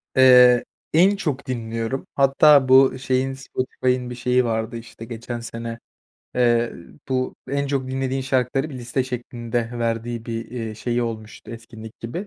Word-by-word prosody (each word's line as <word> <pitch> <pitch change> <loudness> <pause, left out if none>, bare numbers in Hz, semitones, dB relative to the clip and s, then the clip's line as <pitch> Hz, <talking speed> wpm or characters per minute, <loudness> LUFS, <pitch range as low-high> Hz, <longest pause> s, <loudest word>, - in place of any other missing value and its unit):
Eee, 125 -2 +7 0.3
en 185 +6 +5
çok 145 -7 -3
dinliyorum, 115 +1 -3
hatta 140 0 +5
bu 130 +1 +7
ı 130 - -8
şeyin 130 0 0
Spotify'ın 130 -1 -2
bir 125 - -6
şeyi 125 +1 +1
vardı 110 0 -2
işte 115 0 -10
geçen 120 +1 -6
sene, 115 0 -6 0.6
eee, 120 -1 +2 0.4
bu 130 -1 -1
en 140 +1 -1
çok 135 -2 -1
dinlediğin 135 0 -2
şarkıları 130 +2 0
bir - - -8
liste 125 +2 -2
şeklinde 120 -2 -4
verdiği 115 0 -2
bir, 115 0 -4
eee, 115 -3 -5
şeyi 120 +2 -1
olmuştu 110 -2 -6
etkinlik 115 -1 -11
gibi. 170 - -5
125 Hz, 150 wpm, -22 LUFS, 115-130 Hz, 0.6 s, Eee